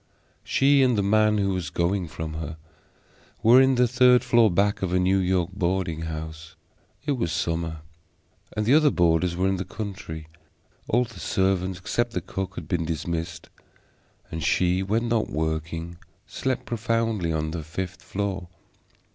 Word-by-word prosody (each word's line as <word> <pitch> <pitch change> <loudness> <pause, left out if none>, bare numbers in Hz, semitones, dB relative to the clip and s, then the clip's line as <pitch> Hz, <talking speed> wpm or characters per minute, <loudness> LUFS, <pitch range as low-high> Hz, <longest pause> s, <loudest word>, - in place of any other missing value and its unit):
She 140 +1 +4
and 125 -4 +3
the 100 - +2
man 110 +1 +3
who 100 -1 +1
was 90 -3 -3
going 90 +1 0
from 80 0 -6
her 80 0 -5 0.9
were 120 +4 +8
in 135 0 +4
the 125 0 +4
third 125 0 +5
floor 120 -2 +4
back 100 +3 +1
of 95 -2 -1
a 90 - +3
New 95 +1 +3
York 90 -1 +1
boarding 90 -3 -1
house. 80 +1 -7 0.5
It 145 - 0
was 115 -12 -1
summer, 80 -2 -2 0.8
and 105 - +1
the 120 - +4
other 155 0 +6
boarders 85 - +2
were 95 +2 +1
in 95 0 +1
the 95 - -2
country; 95 -8 -7 0.6
all 120 +3 +3
the 115 -6 -10
servants 95 -1 0
except 120 +5 -1
the 90 - -1
cook 95 +1 -5
had 75 - -7
been 85 0 0
dismissed, 80 +1 -4 0.8
and 80 -1 -4
she, 90 +5 +2
when 110 +5 0
not 115 -2 0
working, 80 +2 -3 0.3
slept 130 -2 -3
profoundly 115 -5 -1
on 80 -1 -1
the 85 0 -4
fifth 90 +3 -5
floor. 95 0 -3
95 Hz, 165 wpm, -25 LUFS, 85-110 Hz, 0.9 s, were